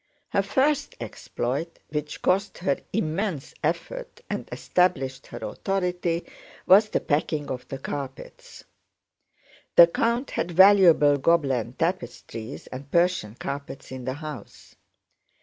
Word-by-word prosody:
Her 200 - +2
first 280 +8 +1
exploit, 140 +8 -4
which 150 0 -4
cost 195 +2 +1
her 155 -6 0
immense 175 -4 -2
effort 475 - -3
and - - -4
established 135 -8 0
her - - -8
authority, 180 -3 -1 0.4
was 205 +3 +6
the - - +1
packing 150 0 -1
of 125 -1 -5
the 135 - -5
carpets. 135 0 -7 1.1
The 170 - +11
count 235 +9 0
had 170 - -2
valuable 175 -5 +6
Gobelin 135 -6 +1
tapestries 130 - -4
and 135 +2 -9
Persian 170 - +1
carpets 140 0 -6
in 130 -1 -7
the 130 - -1
house. 150 -3 -9
165 Hz, 115 wpm, -25 LUFS, 135-185 Hz, 1.1 s, The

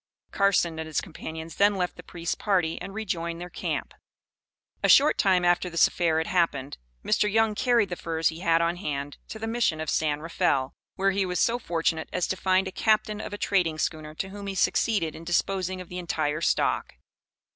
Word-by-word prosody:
Carson 175 -5 +2
and 160 - -4
his 155 - -1
companions 160 -1 -8
then 205 0 +4
left 180 -2 -2
the - - -10
priest's 170 -1 -4
party 180 -6 0
and 190 +2 -6
rejoined 170 -6 -3
their 175 0 -8
camp. - - -3 0.9
A - - +2
short 290 +2 +7
time 185 -3 +3
after 175 +1 +2
this 170 -1 +4
affair 165 -3 0
had 160 - +1
happened, 165 - 0 0.3
Mr. 210 - +2
Young 225 0 +3
carried 235 -2 +2
the 175 - -3
furs 165 -1 0
he 160 +1 -7
had 170 -2 +3
on 170 +1 0
hand 145 -5 -4
to - - -7
the 220 - -5
Mission 225 -8 0
of 160 - -2
San 150 -2 +1
Rafael, 155 -5 0 0.2
where 195 +1 +2
he 195 0 +1
was 180 -1 -2
so 235 +1 +2
fortunate 165 -5 -1
as 180 - 0
to - - -2
find 190 0 +2
a - - -4
captain 215 +1 +1
of - - -6
a 205 - -5
trading 180 -7 +1
schooner 155 -1 -3
to 190 - -4
whom 200 +1 -8
he 195 - -4
succeeded 190 -4 +1
in 165 - -10
disposing 185 +2 -1
of 180 - -8
the 180 +1 -6
entire 155 -3 -1
stock. - - 0
175 Hz, 205 wpm, -26 LUFS, 160-195 Hz, 0.9 s, short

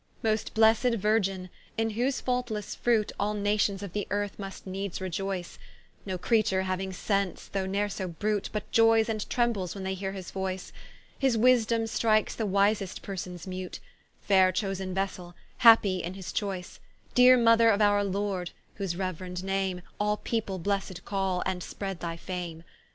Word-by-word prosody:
Most 215 -1 0
blessed 225 +2 +4
Virgin, 195 -4 0 0.3
in 225 0 +1
whose 250 +5 0
faultlesse 245 -5 -2
fruit, 225 -3 +1
All 210 +1 0
Nations 205 -1 +1
of 200 - -7
the 205 -1 -2
earth 205 0 -2
must 195 -1 -7
needes 190 0 -4
reioyce, 190 -1 -4 0.5
No 185 -1 -2
Creature 195 -1 +2
hauing 190 0 -2
sence 195 -1 -1
though 195 -1 -2
ne'r 200 +2 0
so 190 -2 -4
brute, 205 +4 -2
But 210 -1 -2
ioyes 225 0 +5
and 215 -2 -3
trembles 225 -8 0
when 195 - -6
they 190 0 -1
heare 190 0 -4
his 190 -2 -7
voyce; 190 -1 -4 0.5
His 265 -4 +2
wisedome 230 -1 +4
strikes 215 -1 +2
the 220 - -2
wisest 200 0 +1
persons 180 -3 -6
mute, 185 -1 -6 0.4
Faire 190 -2 +4
chosen 190 -1 -2
vessell, 185 -2 -3 0.2
happy 225 -5 +7
in 175 +3 -5
his 190 -2 -7
choyce: 190 -4 -3 0.3
Deere 250 +1 +7
mother 230 -1 +5
of 205 -2 +3
our 205 -1 +4
Lord, 195 -2 -2 0.3
whose 195 -4 -2
reuerend 185 0 -4
name, 190 -2 -1 0.2
All 210 0 +1
people 215 -5 -2
Blessed 190 -1 -2
call, 190 -2 -1
and 185 -1 -2
spread 195 0 -5
thy 165 -1 -4
fame. 170 -2 -6
195 Hz, 160 wpm, -28 LUFS, 185-215 Hz, 0.5 s, happy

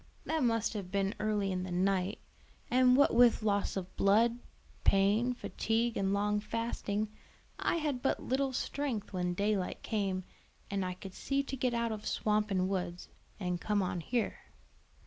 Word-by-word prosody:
That 320 -1 0
must 230 -2 +1
have 200 -4 -5
been 195 +1 0
early 210 -2 0
in 185 -1 -1
the 185 - -5
night; 190 +2 +1 0.5
and 255 0 +5
what 285 - +5
with 235 -2 +5
loss 205 -2 +1
of 185 -1 -5
blood, 230 +4 +3 0.4
pain, 210 +6 +3
fatigue, 230 0 -1
and 195 -1 +1
long 210 +1 +1
fasting, 215 -1 -2 0.5
I - - +1
had 295 -6 -1
but 270 - +1
little 270 +1 0
strength 255 -5 -3
when 180 -1 -1
daylight 200 -1 -1
came 195 -4 -1 0.5
and 200 -1 0
I 180 0 -3
could 190 0 -9
see 275 +6 -1
to 275 - -5
get 250 -2 0
out 235 -1 0
of 215 -1 -5
swamp 210 0 +1
and 185 -2 +1
woods, 180 -2 -3 0.3
and 180 -3 -2
come 210 -2 +1
on 180 -1 -2
here." 235 +7 -1
210 Hz, 165 wpm, -32 LUFS, 195-235 Hz, 0.5 s, and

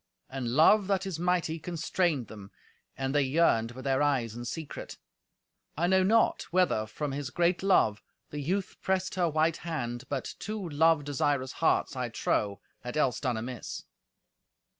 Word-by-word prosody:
And 130 -2 -3
love 190 +6 +6
that 195 -1 0
is 185 -4 -4
mighty 175 -2 0
constrained 170 -4 -1
them, 105 -3 -11 0.5
and 135 0 -2
they 145 - +4
yearned 130 -5 +2
with 130 +1 -9
their 135 0 +2
eyes 130 -6 +1
in 120 0 -6
secret. 155 +4 -6 0.8
I 170 - +1
know 190 +1 +4
not 225 +4 +3
whether, 175 -12 +2
from 145 +6 -4
his 140 -1 -4
great 175 +4 +1
love, 145 - +3 0.3
the 150 - -4
youth 185 +7 -2
pressed 190 -1 0
her 180 -2 +1
white 155 +1 +1
hand, 125 -7 -4
but 140 -2 -3
two 215 -3 -4
love 160 0 +3
desirous 140 -2 0
hearts, - - +1
I - - -2
trow, 100 -2 -1 0.2
had 125 +4 -6
else 130 -7 +2
done 125 -4 -1
amiss. 120 +1 -6
150 Hz, 160 wpm, -29 LUFS, 130-175 Hz, 0.8 s, love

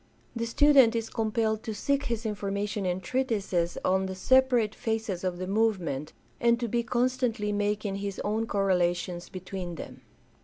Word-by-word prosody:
The 230 0 -2
student 265 -2 +5
is 225 -1 -2
compelled 220 -1 0
to 220 -2 -5
seek 280 +6 0
his 235 -1 -2
information 200 -1 -2
in 180 +1 -1
treatises 200 -8 -1
on 190 +1 +2
the 190 - -5
separate 245 0 +3
phases 220 -5 -2
of 180 -1 -1
the 185 - -4
movement, 185 -9 0 0.3
and 235 0 +3
to 240 - -1
be 235 +2 +1
constantly 240 -3 0
making 205 -1 -1
his 200 -1 -4
own 220 +2 -1
correlations 180 -3 0
between 185 -1 -6
them. - - -9
210 Hz, 155 wpm, -28 LUFS, 190-230 Hz, 0.3 s, student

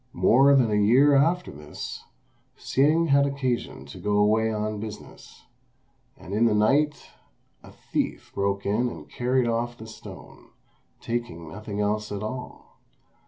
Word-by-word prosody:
More 140 +4 +5
than 120 -5 +3
a 105 0 +2
year 135 +7 +5
after 165 +6 +2
this, 75 0 -8 0.5
Hsing 155 +5 +2
had 140 0 +4
occasion 130 -3 -3
to - - -11
go 105 0 0
away 110 +2 +3
on 105 0 -3
business, 105 -1 -10 0.7
and 95 - -9
in 110 +3 +3
the 110 -2 +3
night 140 +8 +1 0.5
a - - -14
thief - - -4
broke 100 0 -1
in 115 +5 +1
and - - -10
carried 125 0 0
off 120 +1 -2
the 110 - -10
stone, 110 - -12 0.5
taking 115 -9 -4
nothing 105 +4 -5
else 105 +1 -1
at 100 0 -4
all. 125 +4 -8
110 Hz, 145 wpm, -25 LUFS, 105-135 Hz, 0.7 s, More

